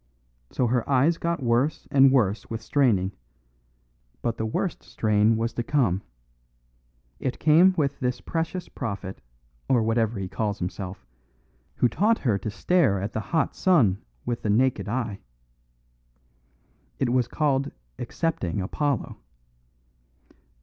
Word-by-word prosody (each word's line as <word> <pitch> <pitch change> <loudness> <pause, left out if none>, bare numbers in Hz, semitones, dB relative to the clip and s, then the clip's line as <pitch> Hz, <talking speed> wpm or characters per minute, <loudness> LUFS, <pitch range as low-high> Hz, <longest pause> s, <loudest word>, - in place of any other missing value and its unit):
So 125 - 0
her 120 +1 0
eyes 140 +5 +3
got 170 -4 -1
worse 125 +5 +1
and 135 -1 +6
worse 110 -6 +1
with 115 -1 -5
straining; 110 -9 +2 1.1
but 115 -1 -1
the 110 - -2
worst 175 - -2
strain 105 +1 +2
was 115 0 -1
to 120 - -2
come. 115 -8 +1 1.2
It 130 - -2
came 170 +5 +5
with 140 -3 0
this 125 -1 -1
precious 165 +2 -3
prophet, 100 - -5 0.5
or 125 -4 +4
whatever 115 0 +1
he 95 -1 -3
calls 105 +1 -2
himself, 90 0 -5 0.7
who - - +3
taught 215 - +2
her 110 -7 0
to 105 - -4
stare 135 - +2
at 100 +4 -4
the - - -1
hot 155 +6 0
sun 125 - +3 0.2
with 120 -1 -2
the 105 - -2
naked 110 -2 +2
eye. 115 -4 -2 1.8
It - - 0
was 125 -1 +2
called 140 0 0 0.3
accepting 120 - -2
Apollo. 140 +7 -2
120 Hz, 130 wpm, -25 LUFS, 105-140 Hz, 1.8 s, and